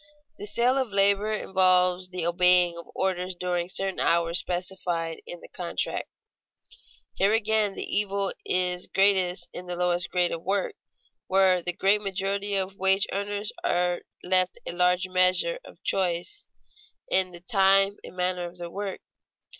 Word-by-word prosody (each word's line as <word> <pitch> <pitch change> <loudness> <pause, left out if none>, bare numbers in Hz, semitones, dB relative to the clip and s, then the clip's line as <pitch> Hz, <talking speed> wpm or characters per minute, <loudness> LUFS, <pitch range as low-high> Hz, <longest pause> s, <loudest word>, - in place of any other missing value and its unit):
The 205 - -6
sale 245 +5 +2
of 255 -5 -2
labor 200 +1 +3
involves 185 -3 +2
the 180 -2 -4
obeying 180 0 +4
of 170 - -10
orders 185 -1 -1
during 175 0 -2
certain 195 0 -2
hours 170 +1 +2
specified 175 -2 -3
in 175 - -8
the - - -12
contract. 175 -2 -3 1.0
Here 200 +2 +2
again 220 -2 +1
the - - -4
evil 200 -1 -1
is 180 -1 0
greatest 185 -3 +2
in 180 - -7
the 180 - -3
lowest 175 0 0
grades 180 -1 +1
of 165 - -5
work, 195 - -1 0.5
while 190 -1 +3
the 180 - -2
great 195 +3 +2
majority 200 +1 -2
of 195 0 -2
wage 190 +1 +3
earners 205 +1 -3
are 175 0 0 0.2
left 185 0 +1
a - - -3
large 180 +1 +1
measure 185 - +2
of - - -16
choice 185 - -2 0.6
in 185 -1 +3
the 175 -1 -11
time 195 0 +3
and - - -11
manner 180 -1 -1
of 175 - -16
their 175 -1 -7
work. 200 0 -5
185 Hz, 155 wpm, -26 LUFS, 180-195 Hz, 1.0 s, obeying